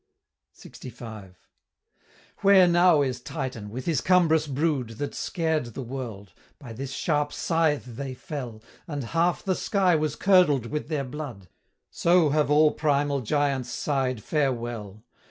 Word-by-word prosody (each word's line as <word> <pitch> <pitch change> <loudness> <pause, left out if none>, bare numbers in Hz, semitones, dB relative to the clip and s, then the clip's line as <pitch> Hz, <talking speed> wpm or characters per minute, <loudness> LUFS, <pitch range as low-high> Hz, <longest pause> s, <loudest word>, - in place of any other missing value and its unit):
LXV. 110 -6 -10 1.0
"Where 195 -2 +6
now 175 -3 +5
is 125 -2 -3
Titan, 125 -5 -5
with 125 +5 -6
his 165 -3 0
cumbrous 165 -4 +3
brood, 140 -3 -1
That 145 - -4
scared 160 -6 -1
the 135 - -4
world? 115 -6 -7 0.2
By 125 -6 -10
this 135 +4 -6
sharp 150 -1 0
scythe 160 -4 0
they 130 +2 -6
fell, 125 -5 -7 0.2
And 145 -4 -4
half 170 +7 0
the 190 - +1
sky 185 -2 +2
was 155 -2 -1
curdled 180 - +4
with 150 +5 -4
their 150 -3 -2
blood: 125 - -8 0.4
So 170 -2 +3
have 150 0 +1
all 150 +1 +5
primal 145 -2 0
giants 140 +1 0
sigh'd 130 -6 -2
farewell. 120 -8 -2
145 Hz, 135 wpm, -26 LUFS, 125-160 Hz, 1.0 s, Where